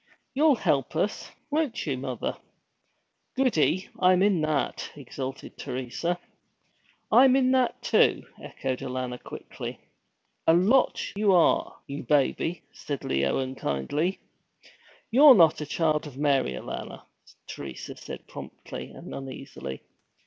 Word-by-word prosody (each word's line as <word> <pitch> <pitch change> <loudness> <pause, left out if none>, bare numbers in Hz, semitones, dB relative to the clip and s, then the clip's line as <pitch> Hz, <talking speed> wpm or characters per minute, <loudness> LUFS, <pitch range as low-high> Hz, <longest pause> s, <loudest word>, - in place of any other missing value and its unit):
You'll 295 +1 +4
help 150 - 0
us, 195 +6 -1 0.2
won't 295 -5 0
you, 140 -4 -1
mother? 130 -2 -3 1.0
Goody 190 - +2
I'm 185 0 +5
in 200 -5 +3
that!' 155 -2 -1
exulted 135 -1 -7
Teresa. 130 +7 -3 0.9
'I'm 260 +1 +7
in 260 -1 +3
that, 255 -2 +1
too!' - - +3 0.2
echoed 130 -1 -4
Alanna 125 -1 -4
quickly. - - -8 0.7
'A 160 - +7
lot 220 +10 +3 0.2
you 205 -1 +3
are, 175 -2 +3
you 140 +1 -6
baby!' 150 +4 +1
said 145 -2 -5
Leo 70 0 +1
unkindly. 130 - -2 0.9
'You're 275 +3 +9
not 165 -5 +5
a 150 - -4
Child 155 -1 0
of 135 -3 -11
Mary, 140 - +2
Alanna,' 65 - -7 0.4
Teresa 65 -3 -7
said, - - -9
promptly - - -9
and - - -10
uneasily. 130 - -7
150 Hz, 120 wpm, -27 LUFS, 130-195 Hz, 1.0 s, You're